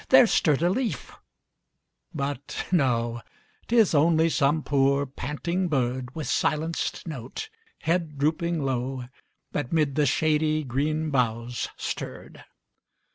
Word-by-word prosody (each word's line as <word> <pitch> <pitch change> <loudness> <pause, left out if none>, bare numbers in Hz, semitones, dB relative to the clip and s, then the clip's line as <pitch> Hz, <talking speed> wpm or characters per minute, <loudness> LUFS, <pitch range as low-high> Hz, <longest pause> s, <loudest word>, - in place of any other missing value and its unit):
there 260 -1 +8
stirred 155 -8 +2
a 175 - +4
leaf, 245 +3 -2 1.0
but 140 -3 -4
no, 120 -8 +1 0.5
Tis 225 -6 +4
only 160 +2 +4
some 145 +2 +2
poor, 140 0 +2
panting 150 +7 -2
bird, 130 -3 -1
With 155 -2 -4
silenced 160 +6 -1
note, 145 - -6 0.3
head 165 -2 0
drooping 160 +2 0
low, 130 0 -2 0.5
That 145 -4 -3
'mid 150 -4 +2
the 145 0 +2
shady 155 +2 +2
green 150 +4 -1
boughs 120 -2 -1
stirred. - - -6
150 Hz, 115 wpm, -26 LUFS, 130-160 Hz, 1.0 s, there